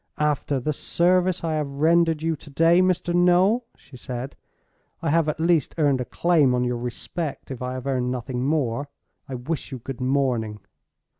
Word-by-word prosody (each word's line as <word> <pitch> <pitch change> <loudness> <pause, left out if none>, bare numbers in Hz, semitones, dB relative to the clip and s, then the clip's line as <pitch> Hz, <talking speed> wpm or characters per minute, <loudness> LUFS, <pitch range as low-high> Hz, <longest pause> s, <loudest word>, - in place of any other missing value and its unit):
"After 150 -2 0
the 150 +5 -1
service 180 +4 +1
I 165 -1 -1
have 150 -2 -1
rendered 160 +2 +2
you 165 0 +1
to 150 - -14
day, 165 +5 +4
Mr. 180 -1 +1
Noel," 180 +7 +4
she 135 - -17
said, 125 +2 -6 0.6
"I 160 - -1
have 165 -1 +3
at 150 - -3
least 165 -3 +2
earned 140 -5 +2
a - - -3
claim 150 -2 +2
on 125 - +1
your 125 -1 -1
respect, 135 +6 -5
if 130 - -6
I 125 0 -3
have 130 0 -6
earned 130 -2 0
nothing 125 0 -3
more. 140 -2 0 0.4
I 130 - -4
wish 145 +5 -4
you 130 - -4
good 125 +1 -7
morning." 125 -5 0
145 Hz, 180 wpm, -24 LUFS, 130-165 Hz, 0.6 s, day